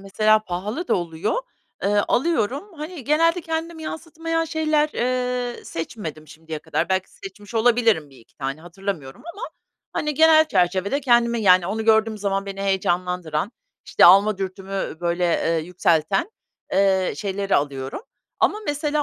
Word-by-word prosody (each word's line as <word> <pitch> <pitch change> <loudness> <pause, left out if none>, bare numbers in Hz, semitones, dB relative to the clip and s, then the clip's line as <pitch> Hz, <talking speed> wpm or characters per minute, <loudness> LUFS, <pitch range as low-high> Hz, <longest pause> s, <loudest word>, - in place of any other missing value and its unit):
mesela 215 +2 +3
pahalı 210 - -4
da - - +3
oluyor, 170 +1 -2 0.5
eee, - - +1 0.2
alıyorum. 290 - 0
Hani, 305 -1 -7
genelde 330 +5 +3
kendimi 325 0 -4
yansıtmayan 330 +1 -3
şeyler, 310 -2 +1
eee, 250 0 -2
seçmedim 160 -3 -6
şimdiye 160 0 -8
kadar. 165 +2 -2
Belki 190 0 -1
seçmiş 200 +3 -11
olabilirim 225 -9 +3
1-2 125 -4 -20
tane, 135 +2 -4
hatırlamıyorum 175 - -6
ama, 410 - -10 0.5
hani, 300 0 -2
genel 315 +1 +6
çerçevede 190 - +1
kendimi, 235 -3 +3
yani, 185 -3 +5
onu 220 +3 -2
gördüğüm 220 -1 +3
zaman 195 -1 -1
beni 195 0 -5
heyecanlandıran, 180 -2 -1 0.3
işte, - - +4
alma 195 +3 +7
dürtümü 195 -2 -4
böyle, 175 +1 0
eee, 165 -1 +1
yükselten, 180 - +1 0.4
eee, 190 -1 +2
şeyleri 200 -1 -1
alıyorum 140 - -3 0.4
ama 425 - +2
mesela 295 0 0
200 Hz, 135 wpm, -22 LUFS, 180-285 Hz, 0.5 s, alma